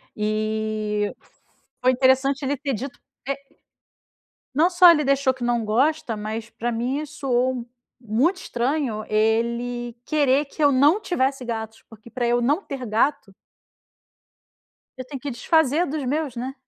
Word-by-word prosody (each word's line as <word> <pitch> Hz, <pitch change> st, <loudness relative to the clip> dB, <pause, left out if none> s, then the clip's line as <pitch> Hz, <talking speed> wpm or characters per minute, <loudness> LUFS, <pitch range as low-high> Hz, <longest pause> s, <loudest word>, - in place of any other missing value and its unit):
E 215 Hz, 0 st, -1 dB, 0.7 s
foi 255 Hz, 0 st, +4 dB
interessante 265 Hz, +2 st, +2 dB
ele 275 Hz, +1 st, -1 dB
ter 280 Hz, 0 st, -3 dB
dito 255 Hz, +4 st, -6 dB, 0.3 s
é 275 Hz, -, 0 dB, 1.2 s
não 315 Hz, +6 st, +4 dB
só 355 Hz, 0 st, +8 dB
ele 300 Hz, -3 st, +3 dB
deixou 275 Hz, -1 st, +2 dB
que 255 Hz, -2 st, -6 dB
não 240 Hz, -1 st, +1 dB
gosta, 250 Hz, +3 st, +1 dB
mas 215 Hz, +2 st, -5 dB
pra 235 Hz, +1 st, -3 dB
mim 245 Hz, +4 st, -1 dB
isso 305 Hz, -2 st, -9 dB
soou 250 Hz, -2 st, 0 dB, 0.3 s
muito 250 Hz, -, +1 dB
estranho 245 Hz, -6 st, -2 dB
ele 235 Hz, +2 st, 0 dB
querer 290 Hz, -2 st, +2 dB
que 305 Hz, -, -6 dB
eu 290 Hz, -1 st, +5 dB
não 290 Hz, +9 st, +4 dB
tivesse 270 Hz, -9 st, -1 dB
gatos, 225 Hz, -2 st, -5 dB
porque 225 Hz, +1 st, -15 dB
para 245 Hz, -2 st, -2 dB
eu 240 Hz, +1 st, +2 dB
não 285 Hz, +9 st, +2 dB
ter 270 Hz, -7 st, -6 dB
gato 225 Hz, 0 st, 0 dB, 1.6 s
eu 255 Hz, -, -6 dB
tenho 275 Hz, 0 st, -7 dB
que 285 Hz, -, -4 dB
desfazer 315 Hz, +6 st, +2 dB
dos 290 Hz, -1 st, -3 dB
meus, 285 Hz, -1 st, -2 dB
né. 255 Hz, +3 st, -4 dB
255 Hz, 150 wpm, -23 LUFS, 230-285 Hz, 1.6 s, só